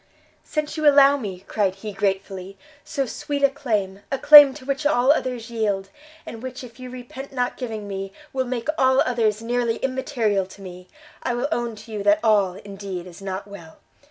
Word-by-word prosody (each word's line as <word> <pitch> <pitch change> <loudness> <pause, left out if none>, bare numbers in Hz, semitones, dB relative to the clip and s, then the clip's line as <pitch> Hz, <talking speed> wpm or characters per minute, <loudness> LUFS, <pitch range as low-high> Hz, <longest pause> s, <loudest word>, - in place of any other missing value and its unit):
"Since 305 +1 -3
you 310 -1 +2
allow 280 0 +6
me," 200 -9 -6
cried 195 -1 -1
he, 210 +1 -7
gratefully, 195 -1 -3 0.3
"so 275 - -2
sweet 285 +3 -4
a 280 - +5
claim, 210 -9 -2
a 275 - 0
claim 290 0 +10
to 260 - -11
which 275 +1 -2
all 275 -2 +4
others 250 -5 -2
yield, 205 -4 -1 0.4
and 225 - -8
which 260 0 -7
if 245 0 -12
you 255 0 -8
repent 255 +2 -9
not 250 -2 -1
giving 220 -5 -5
me, 195 -1 -5 0.2
will 260 -1 0
make 245 -1 -4
all 260 0 +4
others 225 -3 0
nearly 235 -1 0
immaterial 245 -8 -1
to 195 +1 -14
me, 180 -1 -10 0.3
I 245 - -1
will 245 +4 -1
own 235 -4 -2
to 215 +1 -13
you 210 -1 -4
that 205 +1 +4
all, 205 -5 +3
indeed, 195 -3 -7
is 180 0 -12
not 195 0 -5
well! 170 -6 -12
230 Hz, 190 wpm, -23 LUFS, 195-260 Hz, 0.4 s, claim